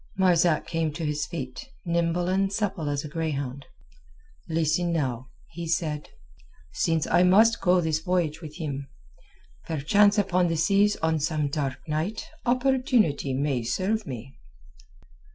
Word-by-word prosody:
Marzak 175 -4 +3
came 165 -2 -1
to 165 +1 -4
his 150 0 -1
feet, 135 - -6 0.2
nimble 170 +1 0
and 195 +1 +1
supple 195 -8 -2
as 145 +1 -2
a - - -4
greyhound. 140 -4 -4 0.8
"Listen 165 +2 +1
now," 130 -6 -2 0.2
he 170 0 -6
said. 155 -2 -2 0.6
"Since 165 - +1
I - - +3
must 215 +6 +5
go 180 -1 +4
this 160 -2 0
voyage 175 -4 -1
with 155 -2 -9
him, 140 -5 -4 0.8
perchance 200 +8 +3
upon 185 -3 +2
the 165 -1 -1
seas 200 +5 +3
on 160 -1 +2
some 150 -1 0
dark 140 -2 -3
night 160 +8 -2 0.2
opportunity 250 - +2
may 135 -2 0
serve 195 - -1
me." 130 +1 -7
165 Hz, 135 wpm, -26 LUFS, 150-185 Hz, 0.8 s, must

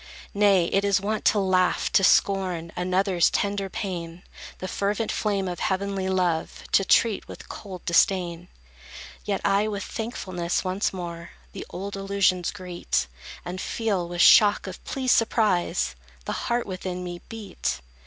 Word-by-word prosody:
Nay, 200 -3 +4
it 195 - +3
is 200 -2 +3
wont 210 +2 -2
to 215 - +4
laugh 185 -2 +2
to 195 - +4
scorn 185 -4 +2
Another's 185 0 +2
tender 200 -1 -1
pain; 175 -4 -5 0.3
The 185 - -5
fervent 205 +4 -1
flame 200 -3 -1
of 175 -1 -4
heavenly 195 0 -1
love 180 -4 -1
To 195 - +4
treat 220 +2 +2
with - - -10
cold 190 -4 -9
disdain. 175 -1 +2 0.8
Yet 200 -2 -1
I 200 +2 +3
with 200 -3 -3
thankfulness 185 -7 -3
once 185 +2 0
more 170 -2 -7 0.2
The - - -8
old 200 +2 -6
illusions 195 -2 +1
greet, 180 -1 -2 0.4
And 180 +1 -5
feel, 200 -6 -1
with 175 0 -1
shock 205 +2 +7
of 190 -1 -8
pleased 260 -2 +1
surprise, 205 - +1 0.3
The - - -3 0.2
heart 240 0 +1
within 185 -1 -5
me 175 -1 -6
beat. 215 - -4
190 Hz, 145 wpm, -25 LUFS, 180-200 Hz, 0.8 s, shock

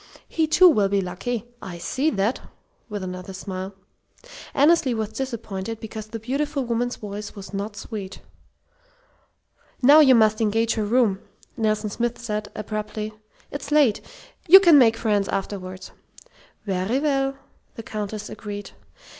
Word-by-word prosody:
He, 320 -1 0
too, 365 +4 +6
will 210 - +4
be 200 0 +2
lucky. 195 +5 -3 0.2
I 180 -3 -7
see 270 - 0
that!" 210 -1 0 0.5
with 205 -2 -4
another 185 +1 -6
smile. 190 0 -6 0.8
Annesley 290 -3 +3
was 220 -2 -2
disappointed 225 -3 -5
because 220 -1 -7
the 225 - -6
beautiful 275 +4 -2
woman's 240 +1 -1
voice 205 0 -7
was 200 0 -10
not 205 +1 -4
sweet. 200 -2 -7 1.6
"Now 290 +5 +8
you 265 -4 +7
must 215 -1 +3
engage 225 +1 +2
her 215 -2 -1
room," 215 -3 +2 0.4
Nelson 215 -1 0
Smith 240 +2 -2
said, 210 -3 -4
abruptly. 215 0 -4 0.4
"It's 285 0 -6
late. 290 -8 +4 0.5
You 380 +4 +11
can 340 -6 +7
make 225 -3 +5
friends 205 -4 +1
afterward." 190 -1 -5 0.7
"Very 195 +4 0
well," 275 -2 0 0.4
the 225 - -7
Countess 210 -1 -5
agreed. 205 -2 -7
220 Hz, 140 wpm, -24 LUFS, 200-255 Hz, 1.6 s, You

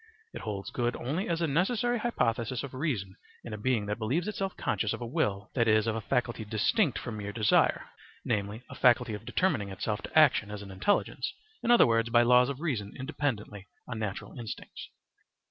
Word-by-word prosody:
It - - -6
holds 100 -2 -5
good 120 0 -1
only 155 +11 -2
as 170 0 0
a - - +2
necessary 235 - +1
hypothesis 125 - 0
of 140 - -7
reason 125 - -2 0.3
in 115 - -7
a - - -2
being 115 -2 +1
that 105 +2 -3
believes 135 - 0
itself 195 -3 -3
conscious 110 - 0
of - - -6
a - - -3
will, 100 -4 -1
that 115 -3 +2
is, 110 0 +4
of 110 -1 0
a 115 - -2
faculty 120 +1 -1
distinct 115 - +1
from 115 -3 -5
mere 100 -1 -4
desire 105 -1 +2 0.4
(namely, 105 +1 -2
a - - -10
faculty 125 -2 +3
of 105 - -7
determining 140 - 0
itself 105 +2 -3
to - - -3
action 145 -9 +5
as 105 -1 -6
an 100 - -10
intelligence, 95 - 0 0.3
in - - -2
other 240 - +8
words, 115 0 +2
by 120 0 +5
laws 125 +2 +5
of 140 +1 -5
reason 115 -12 -2
independently 130 -8 -3 0.2
on 115 -3 -5
natural 105 -3 -4
instincts). 110 -5 -7
120 Hz, 195 wpm, -29 LUFS, 105-140 Hz, 0.4 s, other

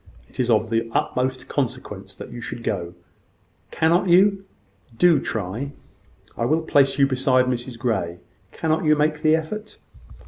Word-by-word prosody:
It - - -15
is 125 -1 +1
of 110 0 +2
the 115 0 0
utmost 130 0 -1
consequence 135 -5 -4
that - - -10
you 120 - -8
should 115 - -6
go. 90 -5 -3 0.7
Cannot 170 +3 +2
you? 195 +2 +4 0.5
Do 170 +1 +5
try. 115 +6 -4 0.6
I - - -3
will 155 +5 +1
place 140 -4 +3
you 140 - +5
beside 130 -1 +2
Mrs 125 -1 -3
Grey. 95 -8 -2 0.3
Cannot 160 0 -1
you 155 -1 +4
make 150 0 0
the 155 0 +4
effort?" 210 +7 -5
135 Hz, 150 wpm, -23 LUFS, 115-160 Hz, 0.7 s, Do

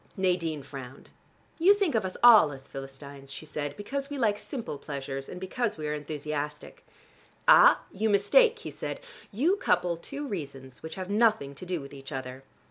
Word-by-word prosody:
Nadine 175 -6 0
frowned. 135 -1 -10 0.5
"You 380 +5 +6
think 395 -6 0
of 220 -4 +1
us 185 - -5
all 220 -11 +8
as 135 0 -11
Philistines," 135 0 -10
she 155 - -8
said, 145 -1 -5
"because 275 +7 -4
we 290 - -5
like 210 -5 +1
simple 230 - -6
pleasures, 135 -1 -5
and 180 - -7
because 210 +3 -2
we 155 -1 -4
are 150 - -1
enthusiastic." 150 0 -5 0.6
"Ah, - - +8
you 220 +3 -1
mistake!" 445 - +4
he 450 - -8
said. - - -5 0.3
"You 315 - +2
couple 180 - +1
two 280 - -6
reasons 135 - -7
which 160 - -7
have 185 +1 -5
nothing 210 -10 +2
to 175 +6 -10
do 180 -2 -1
with 140 - -11
each 135 +1 -9
other. 130 -1 -6
165 Hz, 180 wpm, -28 LUFS, 140-220 Hz, 0.6 s, all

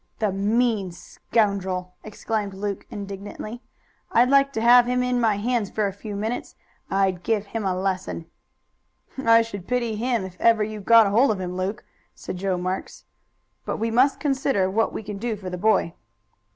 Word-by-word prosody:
"The 215 -3 0
mean 210 0 +1
scoundrel!" 185 -1 -2
exclaimed 210 -1 -3
Luke 200 0 -4
indignantly. 205 +3 -7 0.5
"I'd 245 +3 +4
like 275 0 +5
to 220 - -2
have 240 +1 +7
him 250 0 +1
in 250 -1 0
my 220 -3 +3
hands 225 -1 -1
for 215 - -1
a 195 - -2
few 205 +1 -7
minutes; 220 +4 -4 0.3
I'd 190 -2 +1
give 215 +1 0
him 215 0 -4
a 185 -1 0
lesson." 185 -3 -2 1.0
"I 230 0 +6
should 200 -5 -8
pity 240 -3 0
him 235 -2 0
if 185 -1 -11
ever 225 -2 +4
you 215 0 -5
got 230 +2 +7
hold 225 +7 +4
of 210 -3 0
him, 180 -1 -4
Luke," 185 +3 -3 0.3
said - - -6
Joe 190 0 -1
Marks. 185 +1 -4 0.6
"But - - -3
we 225 +1 -1
must 255 +5 +3
consider 265 -9 +1
what 225 +3 +1
we - - -6
can 205 -1 -6
do 230 0 -2
for 190 -3 -7
the - - -3
boy." 215 -5 +2
210 Hz, 180 wpm, -24 LUFS, 195-230 Hz, 1.0 s, have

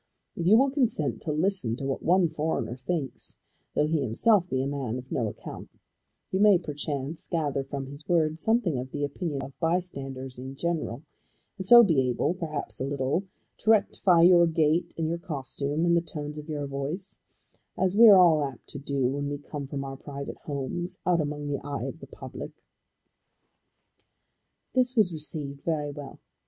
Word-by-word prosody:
If 170 - -2
you 215 +4 +7
will 270 +2 +4
consent 240 - 0
to 155 - -2
listen 155 - 0
to 135 - -6
what 135 -1 -2
one 180 +1 +4
foreigner 155 -7 -2
thinks, 135 -2 -4 0.4
though - - +3
he 155 -1 0
himself 180 - +2
be 130 0 0
a - - -1
man 135 -4 -3
of 130 0 -10
no 115 -4 0
account, 105 - -8 0.6
you 190 - 0
may 205 -2 +7
perchance 145 -2 -4
gather 145 -5 -1
from 135 0 -5
his 140 +3 -11
words 160 -2 +2
something 220 - +1
of 130 +1 -5
the 145 +2 -4
opinion 145 -1 -3
of 135 0 -10
bystanders 135 -7 -3
in 130 +1 -7
general, 155 -5 -2 0.6
and 190 - -4
so 240 +2 +10
be 140 - +3
able, 125 +7 0
perhaps 160 -5 -5
a - - 0
little, 140 +6 -1 0.3
to 220 - -2
rectify 195 -5 +4
your 175 -1 +7
gait 160 +1 +1
and 165 -1 0
your 170 +1 -2
costume 145 0 -3
and 170 0 +4
the 170 - +3
tones 150 -2 -6
of 150 +1 -10
your 145 -2 -2
voice, 140 +7 -4 0.6
as 190 0 +1
we 230 +2 +9
are 200 - +9
all 165 -5 +6
apt 135 -3 -6
to 140 - -5
do 140 -1 -1
when 140 +2 -2
we 145 - -3
come 145 -1 -7
from 140 0 -4
our 135 0 -6
private 140 0 -7
homes, 175 +6 -3
out 175 -2 +3
among 145 0 -4
the 145 -1 -2
eyes 140 0 -4
of - - -9
the - - -11
public." - - -9 2.1
This 255 0 +3
was 205 -7 +3
received 150 -3 -4
very 150 -3 -1
well. 145 -1 -9
150 Hz, 185 wpm, -27 LUFS, 140-175 Hz, 2.1 s, so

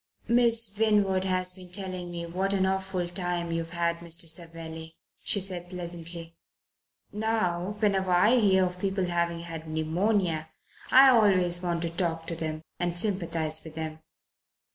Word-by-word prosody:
"Miss 230 -3 +3
Winwood 200 -4 +2
has 185 -1 +1
been 180 -1 -13
telling 185 -2 -3
me 170 -1 -5
what 190 +4 -2
an 190 -1 +2
awful 190 -2 -1
time 175 -1 -2
you've 165 0 -2
had, 170 -1 -1
Mr. 170 0 0
Savelli," 165 -1 -3 0.3
she 205 - +3
said 180 -2 -4
pleasantly. 170 -2 -7 0.8
"Now, 210 -3 -1
whenever 195 -3 +1
I 210 +8 +5
hear 190 -3 +4
of 180 0 -5
people 195 -1 -1
having 170 -1 -1
had 165 -1 -7
pneumonia 160 +1 0 0.4
I 270 +1 +8
always 185 -7 +3
want 170 -2 -2
to 165 - -2
talk 165 -2 -2
to 170 - -3
them 155 -1 -4 0.2
and 175 -1 -1
sympathize 170 -5 0
with 160 -1 -10
them." 160 -1 -5
175 Hz, 150 wpm, -28 LUFS, 170-190 Hz, 0.8 s, I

